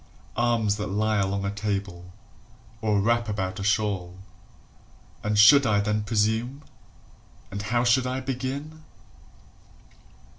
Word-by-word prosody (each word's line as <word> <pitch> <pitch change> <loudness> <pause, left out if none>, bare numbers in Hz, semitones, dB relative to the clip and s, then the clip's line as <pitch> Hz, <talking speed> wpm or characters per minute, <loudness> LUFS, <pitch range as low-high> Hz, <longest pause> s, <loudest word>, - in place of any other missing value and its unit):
Arms 115 -3 +1
that 105 - -3
lie 105 +2 0
along 100 0 -1
a 100 - -1
table, 100 -4 -4 0.7
or 105 -2 +1
wrap 115 +2 +1
about 95 -2 -3
a - - -4
shawl. 100 -4 -1 1.0
And 105 0 -1
should 140 +7 +8
I 105 -4 +2
then 105 +1 0
presume? 110 +6 -1 0.9
And 100 - -4
how 120 +3 0
should 125 +1 +3
I 130 +1 -2
begin? 135 +4 -5
105 Hz, 120 wpm, -25 LUFS, 100-120 Hz, 1.0 s, should